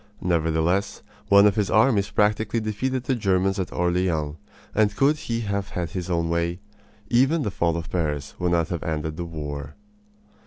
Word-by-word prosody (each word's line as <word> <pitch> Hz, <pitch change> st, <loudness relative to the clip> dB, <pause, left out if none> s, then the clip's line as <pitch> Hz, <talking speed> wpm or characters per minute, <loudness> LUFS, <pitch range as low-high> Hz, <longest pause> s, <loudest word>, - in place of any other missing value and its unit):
Nevertheless, 85 Hz, +3 st, 0 dB, 0.3 s
one 100 Hz, 0 st, +7 dB
of 105 Hz, -, +5 dB
his 105 Hz, -3 st, 0 dB
armies 110 Hz, -3 st, +3 dB
practically 105 Hz, +2 st, +1 dB
defeated 120 Hz, +4 st, -2 dB
the 130 Hz, -, 0 dB
Germans 95 Hz, -3 st, +1 dB
at 95 Hz, -, -3 dB
Orleans; 85 Hz, -4 st, 0 dB, 0.4 s
and 105 Hz, -1 st, +2 dB
could 140 Hz, +6 st, +3 dB
he 115 Hz, -6 st, -3 dB
have 100 Hz, -2 st, -2 dB
had 85 Hz, -3 st, -4 dB
his 90 Hz, 0 st, -4 dB
own 85 Hz, -1 st, 0 dB
way, 85 Hz, +1 st, -1 dB, 0.5 s
even 135 Hz, +6 st, +3 dB
the 105 Hz, -, -2 dB
fall 85 Hz, -3 st, 0 dB
of 80 Hz, -1 st, -6 dB
Paris 75 Hz, -5 st, -2 dB
would 90 Hz, -1 st, 0 dB
not 85 Hz, -2 st, +1 dB
have 85 Hz, -, -3 dB
ended 80 Hz, -1 st, -3 dB
the 85 Hz, -, -4 dB
war. 75 Hz, -3 st, -6 dB
90 Hz, 170 wpm, -24 LUFS, 85-105 Hz, 0.5 s, one